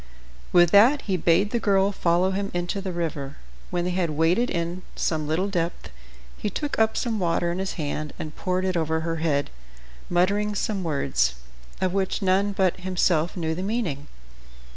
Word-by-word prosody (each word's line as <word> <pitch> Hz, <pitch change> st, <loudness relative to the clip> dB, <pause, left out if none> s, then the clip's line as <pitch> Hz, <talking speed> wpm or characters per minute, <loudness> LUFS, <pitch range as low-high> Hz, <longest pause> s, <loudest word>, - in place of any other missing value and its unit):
With 175 Hz, -1 st, +5 dB
that 240 Hz, +8 st, +6 dB
he 195 Hz, -, 0 dB
bade 180 Hz, +4 st, +2 dB
the 235 Hz, -, +1 dB
girl 200 Hz, -2 st, +3 dB
follow 180 Hz, 0 st, +2 dB
him 195 Hz, +1 st, -2 dB
into 175 Hz, +3 st, -2 dB
the 190 Hz, -1 st, -4 dB
river. 155 Hz, -5 st, -4 dB, 0.3 s
When 175 Hz, -1 st, -1 dB
they 180 Hz, -, 0 dB
had 180 Hz, -2 st, 0 dB
waded 165 Hz, +10 st, +2 dB
in 170 Hz, +2 st, -2 dB
some 155 Hz, -2 st, -1 dB
little 165 Hz, +6 st, 0 dB
depth 170 Hz, -3 st, -3 dB, 0.4 s
he 210 Hz, -, -3 dB
took 290 Hz, +7 st, -3 dB
up 220 Hz, 0 st, +2 dB
some 230 Hz, -4 st, -1 dB
water 170 Hz, -1 st, +1 dB
in 175 Hz, -, -3 dB
his 190 Hz, 0 st, -2 dB
hand 150 Hz, -1 st, -3 dB
and 155 Hz, -1 st, -6 dB
poured 185 Hz, 0 st, -1 dB
it 185 Hz, -1 st, 0 dB
on 160 Hz, -2 st, 0 dB
her 160 Hz, +1 st, -1 dB
head, 150 Hz, -3 st, 0 dB, 0.6 s
muttering 200 Hz, +4 st, +1 dB
some 200 Hz, -1 st, -1 dB
words, 65 Hz, -, 0 dB, 0.4 s
of 185 Hz, -1 st, 0 dB
which 195 Hz, -1 st, 0 dB
none 195 Hz, +2 st, +2 dB
but 190 Hz, -2 st, +1 dB
himself 180 Hz, -2 st, +1 dB
knew 160 Hz, -2 st, -1 dB
the 175 Hz, -, -4 dB
meaning. 190 Hz, -, -2 dB
180 Hz, 180 wpm, -25 LUFS, 165-195 Hz, 0.6 s, that